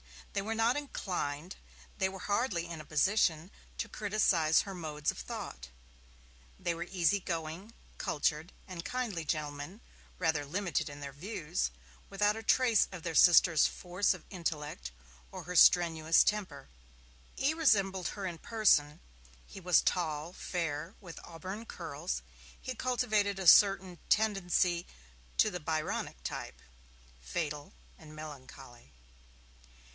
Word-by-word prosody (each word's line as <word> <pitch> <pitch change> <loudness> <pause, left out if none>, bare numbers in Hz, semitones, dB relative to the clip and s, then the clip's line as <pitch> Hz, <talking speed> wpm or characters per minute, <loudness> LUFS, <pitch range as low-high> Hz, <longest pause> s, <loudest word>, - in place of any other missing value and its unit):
They 200 - 0
were 220 +3 -3
not 230 +4 +2
inclined, 180 - -4 0.4
they 190 -1 +2
were 190 - -8
hardly 205 -3 0
in 170 -2 -7
a - - -13
position, 165 +1 +2 0.3
to - - -3
criticize 195 -7 +2
her 195 - -7
modes 155 -4 -2
of - - -11
thought. 65 +1 -7 0.9
They 175 - -1
were 170 +1 -5
easy 185 +2 +2
going, 170 +4 -5 0.3
cultured 155 +3 -1 0.2
and 180 -3 -6
kindly 225 -10 -3
gentlemen, 150 +6 -4 0.4
rather 160 -4 +1
limited 175 +3 -2
in 145 0 -10
their 140 -1 -6
views, 170 - -3 0.4
without 205 +2 +1
a - - -5
trace 230 -1 +4
of 180 -3 -8
their 165 - -3
sister's 170 0 +6
force 180 +3 0
of - - -13
intellect 150 - -4 0.4
or - - -7
her 180 - -6
strenuous 165 -2 +6
temper. 210 - -2 0.7
E. 280 +4 +2
resembled 195 - +2
her 200 -2 -5
in 175 -3 -4
person, 165 -10 +2 0.4
he - - -11
was 180 -2 +4
tall, 160 -1 -1
fair, 165 0 -3
with 175 -5 -10
auburn 190 +6 -7
curls; 165 -3 -5 0.4
he 255 - -5
cultivated 220 -5 0
a 190 - -4
certain 190 -1 +6
tendency 180 -5 +2 0.5
to 215 - +4
the 180 - -4
Byronic 155 - -3
type, 60 - -5 0.6
fatal 145 - -4 0.3
and 155 0 -13
melancholy. 135 - -11
175 Hz, 130 wpm, -32 LUFS, 155-200 Hz, 0.9 s, sister's